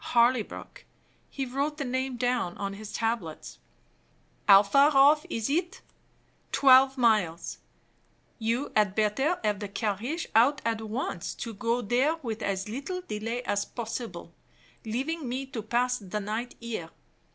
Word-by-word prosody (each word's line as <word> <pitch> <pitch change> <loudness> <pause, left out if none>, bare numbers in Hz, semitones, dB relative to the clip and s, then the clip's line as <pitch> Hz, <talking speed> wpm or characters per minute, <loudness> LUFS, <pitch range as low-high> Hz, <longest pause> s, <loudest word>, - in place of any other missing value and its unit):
Harleybrook 235 -1 +1 0.5
(he 270 - -3
wrote 280 +4 -2
the 285 - -3
name 260 0 -2
down 245 -7 -1
on 195 -1 -3
his 210 +1 -8
tablets). 225 -9 -3 0.9
"How 200 -1 +9
far 275 +8 +5
off 295 +3 +6
is 225 -1 -2
it?" 345 +6 -1 0.7
Twelve 265 0 +6
miles. 210 -9 +1 0.8
"You 235 +5 -1
had 205 -3 +3
better 220 +11 +1
have 210 -2 0
the 205 - -4
carriage 225 - -2
out 265 +6 +5
at 225 -1 0
once, 220 -5 -4
to 230 - -6
go 235 +3 -1
there 255 +9 +2
with 225 -2 -4
as 195 -1 -2
little 285 - -4
delay 230 -4 -4
as 205 -3 0
possible, 225 -7 -6 0.5
leaving 265 +6 -3
me 260 +2 -3
to 255 -4 -6
pass 245 +3 0
the 205 +1 -4
night 220 +4 -4
here. 225 -8 -5
235 Hz, 140 wpm, -28 LUFS, 210-265 Hz, 0.9 s, How